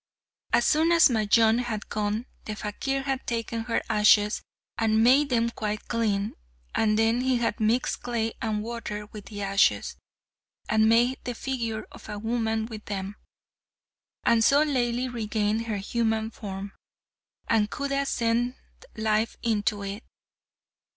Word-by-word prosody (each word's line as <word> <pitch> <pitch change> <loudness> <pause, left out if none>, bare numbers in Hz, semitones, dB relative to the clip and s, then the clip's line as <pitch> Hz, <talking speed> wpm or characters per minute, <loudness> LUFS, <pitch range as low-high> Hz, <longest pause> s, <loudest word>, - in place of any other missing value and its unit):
As 240 - +3
soon 320 +2 +3
as 335 -3 +6
Majnun 225 +1 +4
had 230 -4 -3
gone, 210 +2 -2 0.2
the 215 - -4
fakir 270 +7 -3
had 270 -1 -3
taken 230 -1 -2
her 235 - 0
ashes 210 0 +4 0.4
and 220 0 +3
made 275 +4 +5
them 235 -2 +1
quite 210 -2 -4
clean, 210 -4 0 0.4
and 215 -1 +2
then 225 +2 +2
he 260 -1 +2
had 230 -3 -1
mixed 225 +4 +1
clay 230 -2 -2
and 215 -2 -1
water 215 -2 -5
with 210 -2 -9
the 205 -2 -6
ashes, 195 0 +2 0.7
and 220 0 +3
made 240 +3 +3
the 245 -1 -4
figure 230 -4 -3
of - - -13
a 210 - -4
woman 225 0 -1
with 220 -2 -9
them, 195 0 -4 1.1
and 230 -1 +4
so 285 +6 +5
Laili 250 -3 0
regained 220 -1 -1
her 215 -2 -1
human 220 +2 -1
form, 195 -2 -7 0.7
and 215 -2 +2
Khuda 280 0 -2
sent 235 +2 0 0.4
life 220 0 0
into 210 -2 0
it. 200 +3 -5
225 Hz, 145 wpm, -26 LUFS, 210-240 Hz, 1.1 s, as